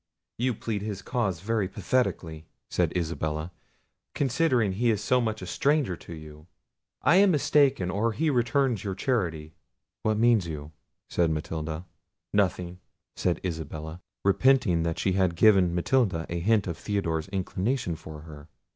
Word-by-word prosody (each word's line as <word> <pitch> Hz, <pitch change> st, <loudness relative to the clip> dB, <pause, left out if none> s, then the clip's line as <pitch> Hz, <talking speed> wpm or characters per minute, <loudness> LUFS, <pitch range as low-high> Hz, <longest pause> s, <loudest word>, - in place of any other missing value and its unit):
"You 125 Hz, -1 st, +1 dB
plead 105 Hz, -1 st, -3 dB
his 100 Hz, -2 st, -5 dB
cause 100 Hz, -10 st, -1 dB
very 110 Hz, -1 st, 0 dB
pathetically," 85 Hz, -11 st, -1 dB, 0.2 s
said -, -, +1 dB
Isabella, 80 Hz, -1 st, -2 dB, 0.6 s
"considering 130 Hz, -6 st, +2 dB
he 115 Hz, +6 st, +1 dB
is 105 Hz, -2 st, 0 dB
so 125 Hz, +2 st, +3 dB
much 110 Hz, -4 st, -2 dB
a -, -, -4 dB
stranger 140 Hz, -, +1 dB
to 85 Hz, 0 st, -10 dB
you! 75 Hz, 0 st, -12 dB, 0.6 s
I 175 Hz, -, +5 dB
am 200 Hz, 0 st, +6 dB
mistaken, 140 Hz, -, +3 dB
or 110 Hz, +5 st, +1 dB
he 155 Hz, +5 st, +1 dB
returns 125 Hz, -3 st, +1 dB
your 95 Hz, -2 st, -3 dB
charity." 85 Hz, -, -1 dB, 0.5 s
"What 110 Hz, -1 st, +1 dB
mean 115 Hz, 0 st, +5 dB
you?" 80 Hz, -4 st, -6 dB, 0.4 s
said 85 Hz, -2 st, +1 dB
Matilda. 80 Hz, +1 st, -4 dB, 0.5 s
"Nothing," 90 Hz, -3 st, 0 dB, 0.4 s
said 90 Hz, -, 0 dB
Isabella, 80 Hz, 0 st, -5 dB, 0.2 s
repenting 100 Hz, -4 st, +4 dB
that 80 Hz, 0 st, -1 dB
she 95 Hz, -, +1 dB
had 95 Hz, -2 st, +1 dB
given 95 Hz, -2 st, +5 dB
Matilda 90 Hz, -3 st, +1 dB
a 85 Hz, -, -2 dB
hint 105 Hz, +4 st, +2 dB
of 85 Hz, -3 st, -4 dB
Theodore's 85 Hz, -7 st, -1 dB
inclination 95 Hz, +1 st, -2 dB
for 80 Hz, -1 st, -10 dB
her. 75 Hz, -1 st, -12 dB
95 Hz, 145 wpm, -27 LUFS, 80-115 Hz, 0.6 s, am